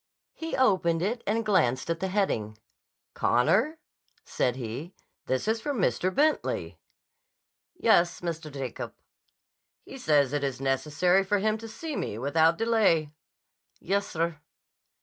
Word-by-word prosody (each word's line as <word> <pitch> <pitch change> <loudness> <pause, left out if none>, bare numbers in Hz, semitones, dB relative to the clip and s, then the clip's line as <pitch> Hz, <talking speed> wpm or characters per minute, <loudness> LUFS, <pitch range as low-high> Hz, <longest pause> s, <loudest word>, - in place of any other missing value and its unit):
He 325 -3 -4
opened 180 -9 +2
it 230 +5 -1
and 225 +2 0
glanced 130 - +2
at 165 - -2
the 190 - -1
heading. 115 - -1 0.6
"Connor," 195 - +2 0.5
said 125 -2 0
he, 130 - -6 0.3
"this 130 +8 -1
is 220 +1 +1
from 285 0 -2
Mr. 185 0 +1
Bentley." 300 +9 0 1.0
"Yes, 175 - +3
Mr. 165 -3 -4
Jacob." 135 -3 -6 0.9
"He - - -10
says 145 -3 +2
it 145 -1 -1
is 135 -2 -2
necessary 150 +8 +2
for 205 +2 +1
him 215 +2 +1
to 225 - -8
see 300 +7 -6
me 105 - -3
without 160 +6 +3
delay." 210 -10 +2 0.7
"Yes, 200 +2 -1
sir." 165 -1 -2
170 Hz, 130 wpm, -27 LUFS, 145-215 Hz, 1.0 s, Yes